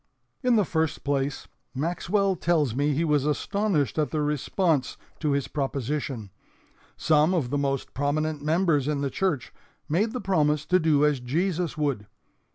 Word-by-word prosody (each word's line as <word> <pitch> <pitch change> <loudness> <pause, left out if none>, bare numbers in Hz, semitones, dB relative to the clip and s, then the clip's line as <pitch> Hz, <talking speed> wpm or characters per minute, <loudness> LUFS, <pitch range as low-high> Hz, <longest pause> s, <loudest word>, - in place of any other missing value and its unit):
"In 250 -3 +3
the 210 -3 +3
first 160 -2 -1
place, 140 0 -1 0.3
Maxwell 180 +6 0
tells 160 -8 +1
me 145 +4 +1
he 150 +4 0
was 150 -3 +2
astonished 155 - 0
at 150 - +1
the 155 -1 -1
response 150 0 0 0.2
to 150 -3 0
his 140 -1 0
proposition. 135 -5 -3 0.7
Some 155 +3 +3
of 135 -8 -1
the 145 - +1
most 135 -1 -2
prominent 150 +2 -1
members 155 -2 +2
in 150 -2 0
the 140 -1 -1
church 165 -10 -1 0.3
made 190 +9 +1
the 250 - -4
promise 155 - +1
to 185 0 +3
do 155 -3 +3
as 150 -3 +2
Jesus 165 +6 -1
would. 140 -9 -1
150 Hz, 160 wpm, -26 LUFS, 140-170 Hz, 0.7 s, In